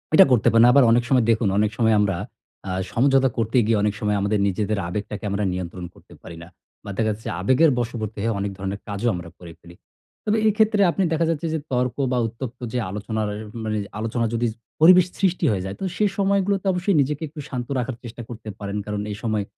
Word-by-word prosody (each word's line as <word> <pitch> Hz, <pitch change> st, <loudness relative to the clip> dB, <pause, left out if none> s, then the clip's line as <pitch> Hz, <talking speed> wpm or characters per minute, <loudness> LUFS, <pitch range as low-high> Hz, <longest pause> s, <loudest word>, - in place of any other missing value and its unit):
এটা 190 Hz, -, +9 dB
করতে 120 Hz, -3 st, +3 dB
পারেন। 115 Hz, +1 st, +6 dB
আবার 140 Hz, +1 st, +6 dB
অনেক 120 Hz, +1 st, +4 dB
সময় 130 Hz, -4 st, +4 dB
দেখুন 110 Hz, -1 st, +1 dB
অনেক 105 Hz, 0 st, +2 dB
সময় 110 Hz, -2 st, +3 dB
আমরা 100 Hz, -2 st, +1 dB, 0.5 s
অ্যা 95 Hz, -1 st, -4 dB, 0.2 s
সমঝোতা 135 Hz, +2 st, +3 dB
করতে 115 Hz, +2 st, 0 dB
গিয়ে 115 Hz, -1 st, +3 dB
অনেক 105 Hz, -1 st, +1 dB
সময় 105 Hz, -1 st, 0 dB
আমাদের 100 Hz, +1 st, +1 dB
নিজেদের 105 Hz, +2 st, -1 dB
আবেগটাকে 105 Hz, +3 st, -5 dB
আমরা 100 Hz, +1 st, -1 dB
নিয়ন্ত্রণ 90 Hz, 0 st, -5 dB
করতে -, -, -18 dB
পারি 85 Hz, -, -10 dB
না। -, -, -12 dB, 0.4 s
বা -, -, -9 dB
দেখা 110 Hz, -, +1 dB
যাচ্ছে 105 Hz, +2 st, -7 dB
আবেগের 130 Hz, -, +4 dB
বশবর্তী 115 Hz, -3 st, -4 dB
হয়ে 110 Hz, -1 st, 0 dB
অনেক 100 Hz, 0 st, -2 dB
ধরনের 100 Hz, +1 st, -4 dB
কাজও 100 Hz, +3 st, -2 dB
আমরা 85 Hz, -1 st, -7 dB
করে 85 Hz, -2 st, -10 dB
ফেলি। 85 Hz, 0 st, -15 dB, 0.5 s
তবে 215 Hz, +1 st, +2 dB
এক্ষেত্রে 215 Hz, 0 st, +2 dB
আপনি 195 Hz, -, 0 dB
দেখা 165 Hz, +1 st, +1 dB
যাচ্ছে 165 Hz, 0 st, -1 dB
যে, 160 Hz, -, -1 dB
তর্ক 125 Hz, -1 st, 0 dB, 0.2 s
বা 125 Hz, -, +1 dB
উত্তপ্ত 120 Hz, +2 st, -7 dB
যে -, -, 0 dB
আলোচনার 105 Hz, +2 st, -3 dB
এর 105 Hz, -, -6 dB, 0.2 s
মানে 110 Hz, -1 st, -2 dB, 0.2 s
আলোচনার 115 Hz, +1 st, -1 dB
যদি 120 Hz, +1 st, +1 dB, 0.3 s
পরিবেশ 180 Hz, +2 st, +8 dB
সৃষ্টি 185 Hz, -2 st, +1 dB
হয়ে 95 Hz, -3 st, -1 dB
যায়, 95 Hz, +1 st, -5 dB
তো -, -, -5 dB
সে 210 Hz, -, +2 dB
সময়গুলোতে 200 Hz, 0 st, +1 dB
অবশ্যই 180 Hz, +2 st, 0 dB
নিজেকে 145 Hz, +2 st, -2 dB
একটু 150 Hz, +1 st, -11 dB
শান্ত 125 Hz, -2 st, -4 dB
রাখার 125 Hz, 0 st, -3 dB
চেষ্টা 120 Hz, 0 st, -8 dB
করতে 110 Hz, -2 st, -8 dB
পারেন। 100 Hz, 0 st, -4 dB
কারণ 105 Hz, -1 st, -3 dB
এই 105 Hz, -, -5 dB
সময় 110 Hz, -2 st, 0 dB
115 Hz, 210 wpm, -23 LUFS, 105-135 Hz, 0.5 s, এটা